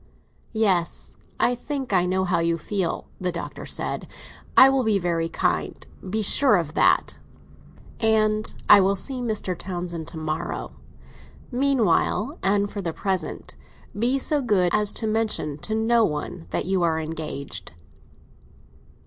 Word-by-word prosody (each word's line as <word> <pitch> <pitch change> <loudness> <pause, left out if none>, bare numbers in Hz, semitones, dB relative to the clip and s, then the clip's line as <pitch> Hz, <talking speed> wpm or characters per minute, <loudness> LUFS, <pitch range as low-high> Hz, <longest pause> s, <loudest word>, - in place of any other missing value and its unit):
"Yes, 190 -6 0 0.2
I 245 - +3
think 265 -1 -4
I 180 -1 +3
know 190 +1 +1
how 185 -2 +1
you 170 0 +1
feel," 185 +1 -2
the 180 -1 -1
Doctor 170 - -7
said. - - -2 0.5
"I 265 - +10
will 270 -1 +2
be 220 -3 +2
very 170 -3 -1
kind—be 210 +5 -2
sure 260 +2 +5
of 165 -4 -1
that. - - +2 0.8
And 215 -1 +2 0.2
I 200 - +9
will 195 +1 +2
see 255 +5 -3
Mr. 215 -6 -2
Townsend 175 -2 -5
to 165 - -8
morrow. 155 0 -4 0.8
Meanwhile, 265 0 +1
and 200 +1 +2
for 200 0 -6
the 170 -3 -3
present, 190 0 -3 0.4
be 240 +6 +1
so 290 +2 0
good 195 -8 +2
as 210 -1 +3
to - - -3
mention 215 -9 -1
to 220 - -3
no 230 +1 +3
one 165 0 -3
that - - -2
you 190 0 +1
are 165 -2 +1
engaged." 150 - -5
195 Hz, 140 wpm, -24 LUFS, 170-220 Hz, 0.8 s, I